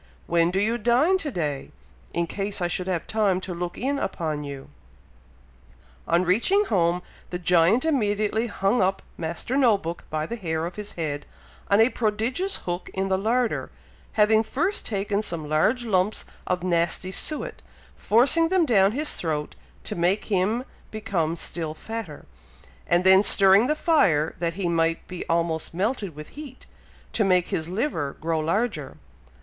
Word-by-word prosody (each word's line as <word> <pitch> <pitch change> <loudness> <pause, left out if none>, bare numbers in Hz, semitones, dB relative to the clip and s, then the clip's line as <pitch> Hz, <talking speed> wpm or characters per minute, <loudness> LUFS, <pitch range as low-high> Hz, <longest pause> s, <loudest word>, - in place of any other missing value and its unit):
When 170 0 +2
do 190 +2 0
you 225 +4 +1
dine 260 - +3
to 315 - -3
day, 150 - -3 0.4
in 170 - 0
case 200 +4 -3
I 175 - 0
should 180 +1 -1
have 180 -3 -1
time 205 -4 +1
to 185 - -5
look 175 0 -5
in 280 +2 -1
upon 155 - -3
you?" 140 -2 -8 1.4
On 170 +2 +3
reaching 240 - +3
home, 180 - +1 0.3
the 180 - -3
giant 180 - +3
immediately 220 -5 +1
hung 200 +2 +1
up 190 +1 0
Master 170 +10 -4
No 245 -7 +4
book 170 -2 -6
by 155 0 -2
the 235 +8 -5
hair 160 -5 -2
of 175 - -6
his 210 -1 -6
head, 145 -3 -4 0.4
on 200 - +4
a 225 +2 +6
prodigious 245 - -1
hook 175 0 -3
in 195 0 -1
the 190 - +2
larder, 230 +3 0 0.4
having 220 +1 +4
first 315 - -2
taken 200 0 -1
some 170 -7 -4
large 215 - +1
lumps 200 -1 0 0.2
of 180 -1 -1
nasty 175 +1 0
suet, 305 +9 -2 0.3
forcing 270 +9 +3
them 365 -1 +3
down 200 -6 +4
his 295 +4 -1
throat 150 -3 -3 0.3
to - - -4
make 180 +4 +1
him 205 +6 +1 0.3
become 185 -7 -2
still 160 -2 -4
fatter, 220 -5 -7 0.6
and 175 +1 +3
then 190 +1 +7
stirring 200 +2 +5
the 305 - +1
fire, 175 - +2
that 170 -1 -1
he 190 -2 -2
might 165 -1 0
be 180 -1 -6
almost 165 -1 -1
melted 200 - -1
with 150 0 -9
heat, 285 -4 -11 0.5
to 220 - +2
make 180 -3 +2
his 160 0 -2
liver 185 - -2
grow 160 0 -1
larger. 165 - -1
190 Hz, 165 wpm, -25 LUFS, 170-225 Hz, 1.4 s, then